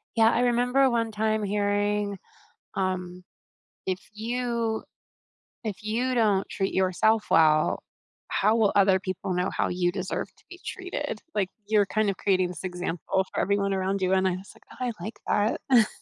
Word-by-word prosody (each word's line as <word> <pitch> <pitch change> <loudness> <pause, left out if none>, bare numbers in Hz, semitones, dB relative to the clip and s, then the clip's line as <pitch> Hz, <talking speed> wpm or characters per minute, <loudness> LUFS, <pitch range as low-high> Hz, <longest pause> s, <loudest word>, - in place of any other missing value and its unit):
Yeah, 225 0 +5
I 240 - +1
remember 250 +2 +3
one 230 -1 0
time 215 0 0
hearing, 205 0 0 0.6
um, 185 -1 -2 0.6
"If 185 -1 0 0.2
you 235 0 -2 0.8
if 210 -4 -3
you 240 +4 -1
don't 210 -5 +2
treat 195 -1 -2
yourself 190 +4 +2
well, 155 -1 +4 0.4
how 215 +3 +2
will 215 -3 +4
other 190 -1 +5
people 185 0 -3
know 180 +1 0
how - - +1
you 175 0 +1
deserve 185 0 -3
to - - -26
be 360 - -11
treated?" 295 - -4
Like, 200 -3 0 0.2
you're 210 -1 +3
kind 215 +1 +1
of 195 - -2
creating 185 -3 +2
this 180 - -8
example 180 +1 -1
for - - -1
everyone 200 0 +1
around 190 +1 -1
you 185 0 +2
and 190 0 +3
I 185 - +2
was 185 +2 -6
like, - - -20
"Oh, 255 - -4
I 245 - 0
like 215 0 0
that." 235 -5 +6
205 Hz, 170 wpm, -27 LUFS, 185-225 Hz, 0.8 s, that